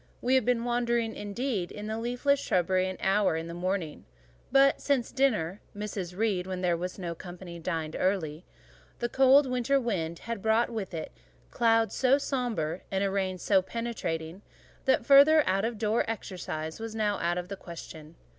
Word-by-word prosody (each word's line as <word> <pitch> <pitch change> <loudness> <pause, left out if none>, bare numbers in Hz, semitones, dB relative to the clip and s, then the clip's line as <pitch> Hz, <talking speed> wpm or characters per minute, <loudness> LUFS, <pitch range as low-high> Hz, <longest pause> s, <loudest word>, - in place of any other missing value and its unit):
We 250 - 0
had 260 -4 +4
been 245 -2 +1
wandering, 235 -1 0
indeed, 205 -2 -3
in 210 - -7
the 220 +1 -3
leafless 245 +4 +1
shrubbery 185 -3 +1
an 185 - -6
hour 195 -2 +2
in 160 - -4
the 170 - -7
morning; 175 -3 -3 0.5
but 275 +1 +5
since 275 -5 0
dinner 210 - +1 0.2
(Mrs. 195 -4 -5
Reed, 200 -4 0
when 185 -1 -4
there 175 -2 +2
was 180 +2 -5
no 175 -3 -4
company, 175 0 -9
dined 160 -2 -3
early) 175 -4 -1 0.5
the 240 - -1
cold 270 +3 +6
winter 255 +2 +1
wind 175 -9 -2
had 230 0 -5
brought 220 +3 +2
with 205 -6 -4
it 160 - -5 0.4
clouds 225 -1 +2
so 265 +1 +4
sombre, 230 - -2
and 195 0 0
a 195 - 0
rain 190 -1 -1
so 190 +2 +3
penetrating, 185 -6 -4 0.4
that 265 - +2
further 290 +2 +7
outdoor 215 +3 +1
exercise 165 -7 -5
was 225 0 -6
now 210 -2 0
out 175 +1 0
of 180 0 -4
the 200 - -5
question. 165 -3 -10
205 Hz, 170 wpm, -29 LUFS, 180-240 Hz, 0.5 s, further